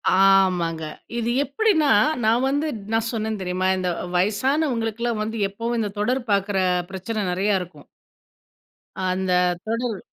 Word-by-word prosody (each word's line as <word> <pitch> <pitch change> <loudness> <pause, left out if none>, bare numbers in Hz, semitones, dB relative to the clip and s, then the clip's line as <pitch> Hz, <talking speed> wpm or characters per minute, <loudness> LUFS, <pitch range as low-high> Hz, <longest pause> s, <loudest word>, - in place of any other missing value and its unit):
ஆமாங்க 185 -4 +3 0.3
இது 235 0 -1
எப்டின்னா 315 - +2 0.3
நான் 230 +4 +3
வந்து 290 +3 0 0.3
நான் 225 0 +1
சொன்னேன் 220 -2 -3
தெரியுமா? 185 0 -1
இந்த 185 -1 -1 0.3
வயசானவங்களுக்குல்லாம் 230 - 0
வந்து 220 +1 -4
எப்பவும் 230 +4 -3
இந்த 210 -2 -1
தொடர் 250 +5 +1
பார்க்கிற 200 0 +1 0.3
பிரச்சனை 205 +3 -4
நெறைய 195 +2 +1
இருக்கும். 170 -5 -11 1.2
அந்த 185 0 -1 0.3
தொடர். 230 -2 -2
215 Hz, 120 wpm, -23 LUFS, 190-235 Hz, 1.2 s, ஆமாங்க